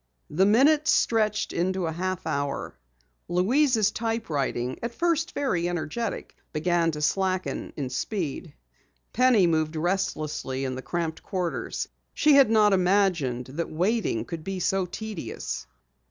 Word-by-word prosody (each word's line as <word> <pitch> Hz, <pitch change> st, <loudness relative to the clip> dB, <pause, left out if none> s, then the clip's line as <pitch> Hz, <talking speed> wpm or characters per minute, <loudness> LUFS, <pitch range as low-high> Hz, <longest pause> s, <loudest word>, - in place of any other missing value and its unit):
The 185 Hz, +6 st, +3 dB
minutes 295 Hz, +8 st, +4 dB
stretched 215 Hz, -2 st, +2 dB
into 185 Hz, +1 st, 0 dB
a 160 Hz, -, -1 dB
half 185 Hz, +2 st, -3 dB
hour. 140 Hz, 0 st, -2 dB, 0.5 s
Louise's 220 Hz, +4 st, +3 dB
typewriting, 145 Hz, -, -2 dB
at 235 Hz, 0 st, -4 dB
first 335 Hz, 0 st, 0 dB
very 175 Hz, -12 st, 0 dB
energetic, 175 Hz, +7 st, -4 dB, 0.2 s
began 165 Hz, +2 st, +1 dB
to 150 Hz, 0 st, -4 dB
slacken 185 Hz, +2 st, -1 dB
in 135 Hz, -4 st, -3 dB
speed. 165 Hz, -, -3 dB, 0.6 s
Penny 250 Hz, -6 st, +5 dB
moved 160 Hz, -1 st, +1 dB
restlessly 155 Hz, -6 st, -2 dB
in 130 Hz, -, -2 dB
the 130 Hz, -, -5 dB
cramped 160 Hz, +4 st, -3 dB
quarters. 180 Hz, -3 st, -3 dB, 0.3 s
She 300 Hz, -, +5 dB
had 275 Hz, -4 st, +7 dB
not 215 Hz, -2 st, +5 dB
imagined 180 Hz, -10 st, +2 dB
that 150 Hz, +7 st, -4 dB
waiting 200 Hz, +8 st, 0 dB
could 165 Hz, -3 st, -6 dB
be 195 Hz, +1 st, -4 dB
so 190 Hz, +1 st, +1 dB
tedious. 185 Hz, -, -5 dB
185 Hz, 130 wpm, -26 LUFS, 155-220 Hz, 0.6 s, had